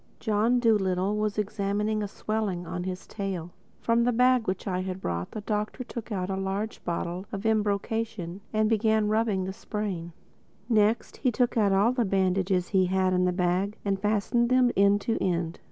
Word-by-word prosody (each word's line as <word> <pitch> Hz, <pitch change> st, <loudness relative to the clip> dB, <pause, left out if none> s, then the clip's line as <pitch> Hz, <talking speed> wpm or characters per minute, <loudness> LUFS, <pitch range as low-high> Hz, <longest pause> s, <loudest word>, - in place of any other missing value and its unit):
John 220 Hz, +3 st, +2 dB
Dolittle 200 Hz, -4 st, +2 dB
was 210 Hz, -1 st, -1 dB
examining 210 Hz, +1 st, -1 dB
a 205 Hz, -, -2 dB
swelling 205 Hz, -3 st, -3 dB
on 180 Hz, +1 st, -4 dB
his 185 Hz, 0 st, -5 dB
tail. 185 Hz, -4 st, -4 dB, 0.3 s
From 230 Hz, 0 st, +2 dB
the 245 Hz, -, +3 dB
bag 250 Hz, 0 st, +3 dB
which 185 Hz, 0 st, -2 dB
I 185 Hz, -2 st, -1 dB
had 185 Hz, 0 st, -4 dB
brought 85 Hz, -, -3 dB
the 215 Hz, -, -6 dB
Doctor 210 Hz, +4 st, -2 dB
took 235 Hz, -2 st, -7 dB
a 190 Hz, -4 st, -2 dB
large 195 Hz, +3 st, -3 dB
bottle 175 Hz, +2 st, -3 dB
of 200 Hz, +2 st, -5 dB
embrocation 210 Hz, -3 st, -1 dB
and 215 Hz, 0 st, +2 dB
began 220 Hz, -1 st, +2 dB
rubbing 215 Hz, -3 st, +1 dB
the 190 Hz, +1 st, -4 dB
sprain. 195 Hz, -5 st, -4 dB, 0.6 s
Next 220 Hz, -1 st, +2 dB
he 255 Hz, -, +1 dB
took 245 Hz, +1 st, +1 dB
all 205 Hz, 0 st, +3 dB
the 250 Hz, -1 st, +1 dB
bandages 190 Hz, -2 st, +1 dB
he 190 Hz, -2 st, +3 dB
had 185 Hz, 0 st, +1 dB
in 180 Hz, 0 st, +2 dB
the 180 Hz, -, +2 dB
bag 180 Hz, +3 st, 0 dB
and 195 Hz, -1 st, 0 dB
fastened 215 Hz, +3 st, +1 dB
them 255 Hz, -1 st, +4 dB
end 200 Hz, +1 st, +4 dB
to 225 Hz, -, -1 dB
end. 170 Hz, -2 st, -1 dB
205 Hz, 175 wpm, -27 LUFS, 185-220 Hz, 0.6 s, them